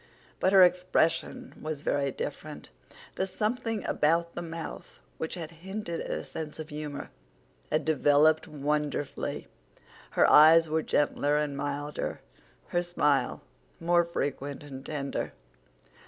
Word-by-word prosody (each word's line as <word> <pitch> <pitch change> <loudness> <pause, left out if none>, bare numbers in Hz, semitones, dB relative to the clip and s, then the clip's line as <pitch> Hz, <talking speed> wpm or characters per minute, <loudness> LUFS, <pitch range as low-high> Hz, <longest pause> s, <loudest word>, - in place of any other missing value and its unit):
But 185 - +3
her 195 -1 +8
expression 180 +7 +1
was 155 -2 -4
very 140 -1 +1
different; - - -6 0.5
the 190 - 0
something 220 +2 -2
about 170 +2 +1
the - - -4
mouth 165 -1 -7 0.2
which 160 - -3
had 165 -3 -6
hinted 190 -2 -4
at - - -5
a - - -2
sense 155 -2 -6
of 155 -1 -7
humor 150 -1 -6 0.6
had 155 0 +1
developed 155 +1 +4
wonderfully; 150 -1 -2 0.7
her - - +6
eyes 160 +2 +8
were 160 +1 +1
gentler 145 -1 +1
and 150 -2 -1
milder, 145 +1 -3 0.5
her 175 - +1
smile 150 -7 +1 0.4
more 175 0 +3
frequent 145 -4 -3
and 135 -2 -9
tender. 140 -2 -3
155 Hz, 125 wpm, -29 LUFS, 145-170 Hz, 0.7 s, her